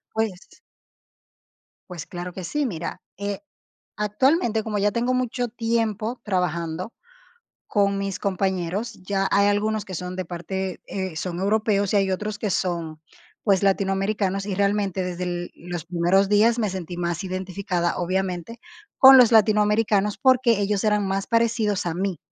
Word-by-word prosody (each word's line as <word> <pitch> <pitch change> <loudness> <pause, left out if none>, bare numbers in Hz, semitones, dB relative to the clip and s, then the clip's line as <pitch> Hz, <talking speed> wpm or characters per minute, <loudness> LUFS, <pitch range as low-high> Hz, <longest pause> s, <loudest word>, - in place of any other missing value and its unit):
Pues 220 -4 0 1.5
Pues, 170 -3 -7
claro 180 -1 -7
que 185 - -7
sí, 295 - -1
mira, 170 -9 -5 0.2
eh, 200 0 -4 0.6
actualmente, 220 - +1
como 210 -1 -3
ya 205 +1 +2
tengo 240 +4 0
mucho 250 -1 -1
tiempo 225 0 -1
trabajando 180 0 -2 0.8
con 200 -1 +1
mis 195 -1 -3
compañeros, 190 +1 -1
ya 195 +1 0
hay 200 0 +4
algunos 210 +1 0
que 185 - -8
son 180 +1 -5
de 185 - -3
parte, 185 +2 -5
eh, 190 -4 -4
son 175 +1 -4
europeos 205 0 +1
y - - +3
hay 195 -1 +2
otros 210 +2 -3
que 210 -1 -2
son, 170 -4 -2 0.4
pues, 195 -3 +3
latinoamericanos, 195 0 0
y 200 - -2
realmente, 200 -1 0
desde 180 0 -3
l 175 0 -4
los 175 -2 -6
primeros 180 +3 +2
días 220 +3 +4
me 215 -4 0
sentí 180 -2 -6
más 175 0 -2
identificada, 185 -2 -2
obviamente, 185 +4 -2 0.4
con 265 0 +10
los 245 -2 +6
latinoamericanos, 210 -1 +3
porque 255 -4 +4
ellos 200 0 0
eran 210 -2 +2
más 195 0 -1
parecidos 230 -3 +1
a 170 - -1
mí. 185 0 -2
195 Hz, 150 wpm, -24 LUFS, 180-215 Hz, 1.5 s, con